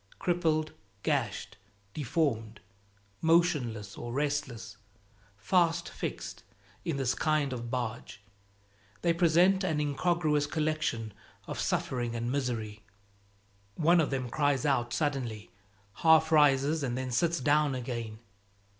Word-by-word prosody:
Crippled, 160 -4 0 0.3
gashed, 120 -9 -1 0.4
deformed, 120 -7 -1 0.6
motionless 140 -11 +1
or 120 - -6
restless, 140 -5 -2 0.6
fast 165 - +1
fixed - - -5 0.4
in 160 -4 -2
this 130 -2 +1
kind 150 -3 0
of 120 -1 -5
barge, 120 -4 -4 0.8
they 170 -1 +3
present 175 +3 +4
an 160 -5 0
incongruous 150 0 +1
collection 155 -9 -1 0.3
of - - -6
suffering 120 -2 -1
and 120 +1 -2
misery. 115 -6 -3 0.9
One 170 +4 +4
of 155 - 0
them 130 -2 -2
cries 145 +1 +1
out 120 -4 +1
suddenly, 120 -7 -2 0.5
half 160 -1 +5
rises, 150 0 +4
and 125 -3 -2
then 130 -1 -3
sits 170 +7 +1
down 145 +1 +2
again. 115 -3 -5
140 Hz, 110 wpm, -30 LUFS, 120-155 Hz, 0.9 s, half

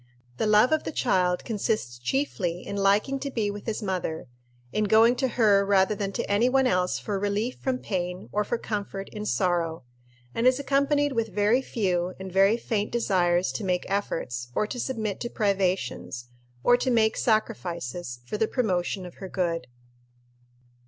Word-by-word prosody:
The 220 - 0
love 210 +5 +5
of 315 - +2
the - - -4
child 180 - +1
consists 205 - -2
chiefly 180 - -2
in 200 - -5
liking 200 +7 +2
to 280 - -3
be 220 -6 -1
with 205 +2 -9
his 220 0 -2
mother, 180 -5 -2 0.5
in 215 - +1
going 225 +4 +5
to 260 +1 +1
her 210 -5 +4
rather 195 0 +3
than 200 -1 -3
to - - -2
any 210 +5 +3
one 265 +1 +3
else 180 -6 +1
for 200 -2 -3
relief 205 +5 -1
from 260 -1 -1
pain 180 -5 -4
or 210 - +1
for 235 - -1
comfort 200 -3 -4
in 210 0 -6
sorrow, 170 -6 0 0.5
and 230 - +2
is 255 +1 +4
accompanied 285 +1 +2
with 230 -3 0
very 210 +5 +2
few 185 -7 -1
and 190 0 -7
very 195 +4 +4
faint 215 -3 -2
desires 180 -6 +2
to 220 - -5
make 180 -2 0
efforts, 125 -11 -2
or - - +2
to 245 +4 -6
submit 220 -5 -2
to 240 - -3
privations, 190 - -1 0.3
or 245 - +6
to 260 - -1
make 220 -2 +3
sacrifices, 175 - -2
for 210 +12 -4
the 220 - +2
promotion 190 -6 -1
of 175 - -11
her 190 - -6
good. 170 -3 -1
205 Hz, 175 wpm, -26 LUFS, 180-230 Hz, 0.5 s, or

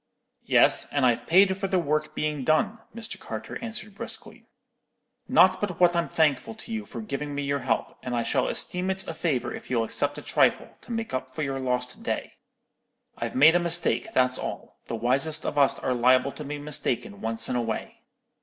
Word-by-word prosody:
"Yes; - - +4
and 140 -2 +2
I've 120 -2 +1
paid 190 +3 +5
for 195 0 -3
the 190 - +1
work 155 -2 -1
being 150 -2 -2
done,' 155 - +1 0.2
Mr. 230 -1 -7
Carter - - -6
answered 220 -2 -5
briskly; 195 - -5 0.8
'not - - +5
but 190 -5 -3
what 175 -1 +5
I'm 170 0 0
thankful 155 - +1
to 225 +1 -8
you 220 -1 -4
for - - -7
giving 145 -8 -4
me 145 - -2
your 140 0 -1
help, 130 -1 -2
and 125 -1 -3
I 120 - 0
shall 130 +2 +1
esteem 180 +1 0
it 190 0 -2
a - - -4
favour 155 -6 -1
if - - -9
you'll 120 -3 +1
accept 115 +6 -2
a - - -8
trifle, - - +1
to - - -11
make 225 - -3
up 130 0 -3
for 130 +4 -4
your 135 -1 -2
lost 125 -1 -2
day. - - -3 0.8
I've - - -5
made 150 +5 +7
a 175 - +4
mistake, 175 0 +2
that's 125 0 +2
all; - - -7
the - - -3
wisest 135 +7 +1
of - - -2
us 140 -2 +4
are 130 - -1
liable 130 +2 +3
to 150 - -8
be 145 +1 -5
mistaken 135 -8 -2
once 115 0 -1
in - - -2
a 120 - +1
way.' 115 -2 -5
145 Hz, 205 wpm, -26 LUFS, 130-175 Hz, 0.8 s, made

